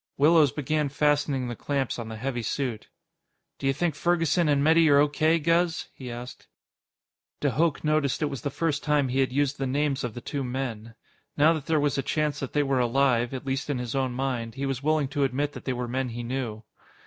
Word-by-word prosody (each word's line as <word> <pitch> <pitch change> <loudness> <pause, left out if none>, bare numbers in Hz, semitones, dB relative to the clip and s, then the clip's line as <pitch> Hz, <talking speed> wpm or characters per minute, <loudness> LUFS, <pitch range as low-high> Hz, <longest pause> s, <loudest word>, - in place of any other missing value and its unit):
Willows 150 -1 +5
began 150 0 -1
fastening 145 -2 +1
the 120 - -4
clamps 135 0 -2
on 115 - -5
the 110 - -6
heavy 120 +1 -3
suit. 120 -1 -3 0.7
"D'you 135 - +1
think 160 +4 0
Ferguson 165 +1 +1
and 140 -1 +3
Metty 160 +1 +5
are 140 - +6
O.K., 150 +3 +3
Guz?" 165 +1 +1
he 130 -2 -8
asked. 120 +1 -8 0.9
De - - +1
Hooch 160 0 +1
noticed 155 -1 +1
it - - +3
was 140 -3 -4
the 140 - -2
first 150 0 -1
time 145 -3 +2
he 130 +2 0
had 130 -1 +2
used 140 +1 0
the 135 - -1
names 140 +1 0
of 120 -3 -4
the - - -5
two 140 +3 -4
men. 120 -3 -4 0.4
Now 155 +3 +5
that 155 -3 -5
there 160 -2 +2
was 145 -1 +1
a - - +2
chance 150 +1 -1
that 135 - -5
they 145 - +2
were 135 -2 +1
alive, 120 -1 +2
at 130 -1 -6
least 135 +2 -2
in 145 - 0
his 125 -2 -4
own 130 -2 0
mind, 125 -3 -3
he 135 +1 -3
was 135 -1 -2
willing 155 -1 +1
to 145 0 0
admit 140 +2 0
that - - -10
they 130 - 0
were 125 0 -3
men 130 +1 -2
he 120 +1 -5
knew. 120 -3 -4
140 Hz, 220 wpm, -26 LUFS, 125-150 Hz, 0.9 s, are